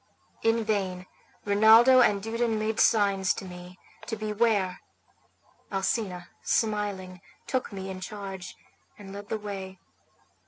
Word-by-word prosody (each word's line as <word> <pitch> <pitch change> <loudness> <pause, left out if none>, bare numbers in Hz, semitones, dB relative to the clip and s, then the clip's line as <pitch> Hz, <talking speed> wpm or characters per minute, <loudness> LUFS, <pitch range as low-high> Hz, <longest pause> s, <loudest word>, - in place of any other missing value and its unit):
In 225 0 +2
vain 190 -4 -2 0.4
Rinaldo 220 +5 +7
and 200 -4 +3
Dudon 225 0 0
made 215 +1 -1
signs 200 -4 +3
to - - -7
me 180 0 -10 0.3
to 225 - -2
beware; 210 -3 0 0.9
Alcina, 190 -2 -2
smiling, 200 -4 -1 0.2
took 260 -2 -2
me 190 -1 -6
in 185 0 -7
charge, 195 -2 -7 0.4
and 195 -2 -10
led 205 0 -9
the 220 - -1
way. 195 -2 -7
205 Hz, 120 wpm, -27 LUFS, 190-220 Hz, 0.9 s, Rinaldo